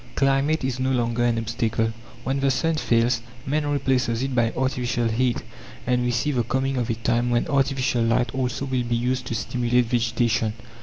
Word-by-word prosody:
Climate 135 +3 +2
is 130 -1 -2
no 130 0 0
longer 120 -2 +1
an 120 -1 +2
obstacle. 115 0 -1 0.3
When 135 +1 -1
the 135 0 +2
sun 165 +5 +1
fails, 120 -5 +2 0.2
man 150 +2 0
replaces 130 -4 +1
it 135 0 -2
by 120 -2 +2
artificial 125 -2 0
heat; 120 +2 0 0.4
and 125 0 +1
we 125 - 0
see 120 +5 0
the 125 -4 +1
coming 130 +3 -1
of 120 -2 -1
a 115 - +1
time 115 +2 0
when 120 -1 +2
artificial 135 -3 +1
light 115 +1 +1
also 130 0 -2
will 130 -2 0
be 120 0 -1
used 125 +2 -1
to 115 - -2
stimulate 120 +1 +1
vegetation. 115 -2 +1
125 Hz, 190 wpm, -24 LUFS, 115-135 Hz, 0.4 s, Climate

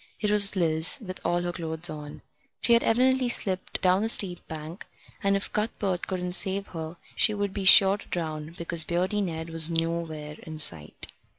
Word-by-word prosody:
It 210 -1 -1
was 205 -1 +4
Liz, 160 -2 +2
with 185 -6 -9
all 175 0 -1
her 175 - -3
clothes 165 -1 0
on. 150 -1 -10 0.4
She 235 - +2
had 235 - +3
evidently 255 +2 +1
slipped 190 -5 -2
down 185 +1 +3
the 220 - 0
steep 185 -6 +4
bank, 160 +3 -9 0.3
and 200 -1 +1
if 195 - -4
Cuthbert 200 -4 -3
couldn't 180 -1 -4
save 195 +1 +2
her 160 0 -8 0.2
she 215 - +2
would 200 -1 -3
be 195 - -5
sure 195 +1 +8
to - - -14
drown, 155 -1 -5
because 170 -1 +1
Beardy 185 +5 -2
Ned 165 -3 -5
was 165 0 +4
nowhere 165 -2 -4
in 160 -1 -9
sight. 85 - 0
175 Hz, 185 wpm, -25 LUFS, 160-200 Hz, 0.4 s, sure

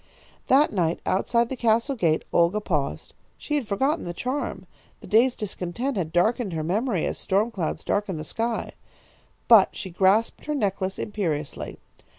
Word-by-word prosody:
"That 275 0 +4
night 170 -4 0
outside 235 +5 +1
the 265 - -3
castle 235 +3 +1
gate 165 -8 +1
Olga 170 +5 +3
paused. 150 -9 -2 0.2
She 295 - -5
had 285 -6 0
forgotten 270 +10 0
the 175 0 -5
charm. 260 +7 -3 0.3
The - - -12
day's 235 +4 +4
discontent 210 +5 -4
had 170 -5 -2
darkened 205 +3 +1
her 160 -1 -2
memory 200 +3 0
as - - -3
storm 205 +5 +1
clouds 175 -8 -3
darken 205 -4 -1
the 155 - -5
sky. 230 +8 -3 0.8
But 220 -5 +6
she 190 - -6
grasped 195 +5 +2
her 300 - -1
necklace 195 -5 -1
imperiously. 165 -9 -3
205 Hz, 160 wpm, -25 LUFS, 175-235 Hz, 0.8 s, But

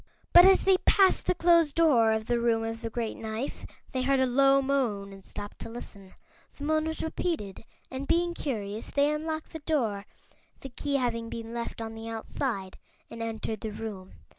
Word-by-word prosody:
But 350 +1 +10
as 385 0 +6
they 385 -1 +4
passed 385 0 +3
the - - +2
closed 335 -4 +4
door 260 -10 +5
of 220 0 -1
the 240 +1 +1
Room 230 -1 +1
of 225 0 -4
the 230 - -3
Great 225 -1 -3
Knife 220 +4 -5 0.2
they 260 - -1
heard 270 +1 +2
a 260 - +4
low 275 +2 +4
moan 240 -8 -1
and 195 0 -13
stopped 205 +2 -8
to - - -7
listen. 200 -5 -10 0.4
The 285 - -8
moan 310 +1 +1
was 320 - -3
repeated 315 - -3 0.3
and, 265 +1 -5
being 345 +1 +2
curious, 220 -9 -4
they 285 +1 +2
unlocked 315 +1 -4
the 320 - -5
door 230 -11 -1 0.5
the 270 - -7
key 280 +3 -3
having 230 -3 -1
been 230 0 -6
left 235 -1 -5
on 225 0 -5
the 225 0 -7
outside 220 -3 -4 0.3
and 230 - -7
entered 220 -1 -4
the 220 - -3
room. 205 -4 -7
240 Hz, 190 wpm, -28 LUFS, 220-295 Hz, 0.5 s, But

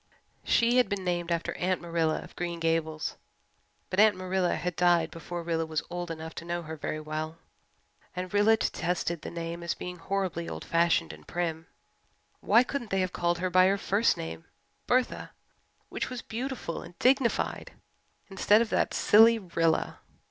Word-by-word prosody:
She 235 +1 +3
had 250 - +4
been 200 -2 -2
named 175 -1 -1
after 170 -1 -1
Aunt 185 0 0
Marilla 165 -2 -1
of - - -14
Green 175 -1 -3
Gables, 165 -1 -1 0.7
but 185 - 0
Aunt 215 -1 +6
Marilla 185 -1 0
had 180 -1 -3
died 175 -2 +3
before 170 +1 -6
Rilla 165 -1 0
was 160 0 -2
old 175 0 -4
enough 160 0 -6
to - - -11
know 175 0 -3
her 160 0 -6
very 155 0 -4
well, 155 +1 -5 0.8
and 180 +1 -5
Rilla 210 +2 +5
detested 175 -4 -1
the - - -6
name 170 0 -5
as 170 - -2
being 180 0 -6
horribly 185 -1 -2
old - - -6
fashioned 170 0 +2
and - - -15
prim. 165 -2 -3 0.7
Why 235 - +5
couldn't 255 -3 -4
they 195 0 +1
have 185 -1 -2
called 175 0 0
her 185 +1 -2
by 185 +1 +6
her 195 +1 +2
first 200 +3 +2
name, 80 0 -6 0.4
Bertha, 255 0 0 0.6
which - - -3
was 250 -2 -6
beautiful 245 -6 -4
and 175 - -12
dignified, 260 -2 +1 0.5
instead 200 +2 +4
of 225 - -8
that - - +1
silly 225 +2 +6
"Rilla"? 165 -5 0
175 Hz, 170 wpm, -28 LUFS, 165-195 Hz, 0.8 s, Aunt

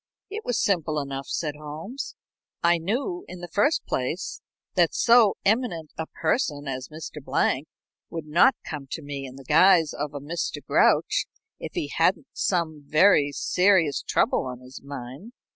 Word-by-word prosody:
"It 430 +2 -5
was 245 - -1
simple 160 -6 +1
enough," 135 -1 -5
said 150 -3 -2
Holmes. 155 - -7 0.5
"I 170 0 +4
knew, 265 - -2
in 180 - -9
the 175 - -6
first 205 - +1
place, - - -3 0.3
that - - +2
so 235 -4 +5
eminent 200 -8 0
a 160 - -4
person 145 - -1
as 130 -1 -4
Mr. 155 -2 -8
Blank 135 +1 0 0.4
would 165 -2 -5
not 170 - +5
come 145 -4 -6
to 160 - -5
me 140 -1 -5
in 130 - -11
the 135 - -11
guise 165 +3 +5
of 145 0 -4
a - - -3
Mr. 165 +5 -3
Grouch - - +3 0.3
if - - -7
he - - -2
hadn't - - +2
some 165 -5 -1
very 155 -3 +5
serious 180 -3 +2
trouble - - +1
on 125 -1 -7
his 130 +1 -11
mind. 140 - -9
160 Hz, 160 wpm, -25 LUFS, 145-195 Hz, 0.5 s, so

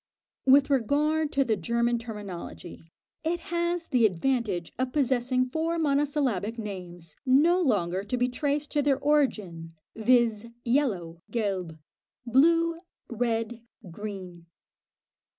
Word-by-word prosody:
With 275 +2 +6
regard 295 +4 +1
to 275 - +3
the 225 -3 +1
German 235 +5 0
terminology, 205 -7 -8 0.4
it 340 +2 -1
has 345 0 -1
the 250 -3 +3
advantage 200 -3 -1
of 255 -1 -1
possessing 255 -2 +1
four 320 +5 -1
monosyllabic 280 - 0
names 180 -6 -7
no 300 +7 +4
longer 195 - +1
to 250 +5 -2
be 245 0 +2
traced 285 +3 -2
to 295 - +2
their 280 -2 +2
origin, 210 - 0 0.2
viz., 230 -1 +2 0.2
yellow 200 - 0
(Gelb), 190 -8 -2 0.5
blue, 330 +7 +3 0.3
red, 230 0 -1 0.3
green. 185 -3 -8
240 Hz, 115 wpm, -27 LUFS, 205-285 Hz, 0.5 s, With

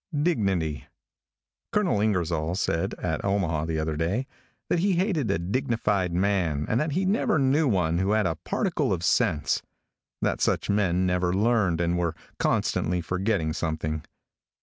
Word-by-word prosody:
DIGNITY. 95 - 0 0.9
|COLONEL 180 - +2
INGERSOLL 85 -5 0
said, 85 -3 -1
at - - -3
Omaha 85 -6 0
the 80 -1 -2
other 80 0 -1
day, 90 - -1 0.4
that 175 - +1
he 195 +2 +2
hated 175 - 0
a 95 - +2
dignified 100 -1 0
man 85 -5 +1
and 115 - +1
that 150 0 -1
he 185 +4 0
never 195 -4 +2
knew 140 +2 +3
one 90 -7 +1
who 95 +3 +1
had 110 -2 +2
a 85 - +1
particle - - 0
of 85 -2 -3
sense; 75 -3 +1 0.6
that - - -1
such - - +1
men 95 -3 +2
never 90 -1 +1
learned, 100 -4 +2
and 85 0 +1
were 85 -2 -1 0.2
constantly 90 +2 +1
forgetting 90 -2 -1
something. 80 -2 -2
95 Hz, 150 wpm, -26 LUFS, 85-115 Hz, 0.9 s, knew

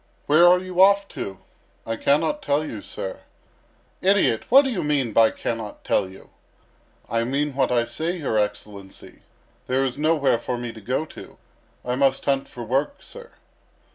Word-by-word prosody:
"Where 155 +4 +6
are 180 +1 +6
you 185 0 -1
off 200 +1 +5
to?" 95 -1 -6 0.5
"I 115 - -2
cannot 160 - +1
tell 150 - 0
you, 110 -8 -7
sir." 95 - -7 0.8
"Idiot! 190 - +2
What 270 +4 +7
do 265 - -2
you 200 - -2
mean 140 -6 0
by 115 0 +5
'cannot 110 -2 -5
tell 95 - 0
you?'" 95 - -15 0.8
"I 115 0 0
mean 140 +4 -1
what 135 -1 0
I 120 -1 +2
say, 160 +10 -3
your 130 -9 -1
Excellency. 105 -1 -6 0.5
There 130 +1 +1
is 130 +1 -4
nowhere 150 -6 +2
for 125 - -3
me 120 -1 -6
to 110 - -12
go 130 +8 -2
to. - - -13 0.5
I 125 - -1
must 135 +1 +1
hunt 135 -1 0
for 120 - -8
work, 135 - -2
sir." 480 0 -13
135 Hz, 170 wpm, -23 LUFS, 115-165 Hz, 0.8 s, What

